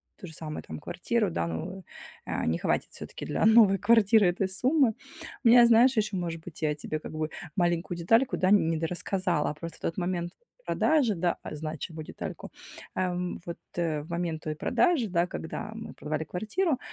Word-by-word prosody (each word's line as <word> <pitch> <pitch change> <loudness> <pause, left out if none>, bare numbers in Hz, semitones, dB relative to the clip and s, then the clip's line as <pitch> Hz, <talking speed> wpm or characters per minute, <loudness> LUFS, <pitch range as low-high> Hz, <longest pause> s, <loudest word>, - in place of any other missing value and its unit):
то - - -10
же 160 - -11
самое 155 -1 -6
там, - - -6
квартиру, 210 +7 -1
да, 85 - -1
ну, 85 - -5 0.4
а, - - -2
не 80 +1 +1
хватит - - -1
всё-таки - - -8
для - - 0
новой 220 -3 +7
квартиры 220 0 +5
этой 180 +2 +1
суммы. 250 +5 +2 0.5
У - - +4
меня, 240 0 +8
знаешь, 240 +2 +5
ещё, 215 -2 +1
может 165 -2 -3
быть, 165 -1 -9
я 150 -1 +2
тебе 155 +1 -4
как - - -9
бы 155 0 -3 0.3
маленькую 175 -1 0
детальку, 225 +10 +3
да, 185 - +1
н 195 -4 +5
не 165 - 0
дорассказала. 175 0 -1
А - - -5
просто 165 +2 -8
в - - -27
тот 165 - -3
момент 175 -1 -2 0.3
продажи, 285 -10 +2
да 175 0 0
а, 155 - -6
значимую 155 +1 -6
детальку. - - -7 0.4
Ам. 180 -1 -2
Вот, 170 - -5 0.2
э, 160 -3 0
в 155 - -13
момент 170 -2 -2
той 155 -3 -4
продажи, 320 - +2
да, 175 -2 +1
когда 170 +5 -6
мы 225 - -8
продавали 155 +1 -3
квартиру, 255 - -1
175 Hz, 190 wpm, -28 LUFS, 160-220 Hz, 0.5 s, меня